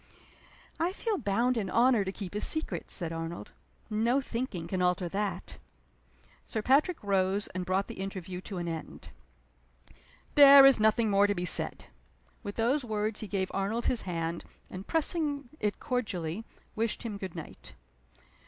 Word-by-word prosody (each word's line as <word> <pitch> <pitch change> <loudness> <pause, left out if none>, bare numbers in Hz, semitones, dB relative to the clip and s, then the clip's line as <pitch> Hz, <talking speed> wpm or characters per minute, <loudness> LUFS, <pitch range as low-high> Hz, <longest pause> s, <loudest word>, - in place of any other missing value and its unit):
"I 345 +3 0
feel 425 -2 -2
bound 235 +5 +1
in 200 -4 -2
honor 235 -1 +4
to 190 - -3
keep 195 -2 -7
his 210 - +1
secret," 315 0 0
said 170 -3 -5
Arnold. 165 +1 -6 0.4
"No 230 +4 +1
thinking 230 -10 -4
can 185 +1 -2
alter 180 0 +1
that." 195 0 -4 0.8
Sir 220 - -4
Patrick 300 - +3
rose, 195 0 +1
and 180 -1 -5
brought 190 +2 +1
the - - -9
interview 185 -2 -6
to 195 0 -7
an 175 -1 -3
end. 165 -1 -7 1.2
"There 280 -1 +10
is 275 -4 +6
nothing 220 0 +3
more 200 +1 +4
to 205 - 0
be 175 - -2
said." - - +1 0.6
With 205 - -6
those 250 +5 +1
words 215 -2 -2
he 215 - -5
gave 190 -2 -2
Arnold 205 +5 -1
his 245 - +1
hand, 170 -2 -3 0.3
and, 185 +1 -8
pressing 300 -4 0
it 210 -1 -1
cordially, 205 -6 -3 0.3
wished 225 0 -2
him 210 -4 -5
good 190 -3 -6
night. 150 - -10
205 Hz, 160 wpm, -29 LUFS, 185-240 Hz, 1.2 s, There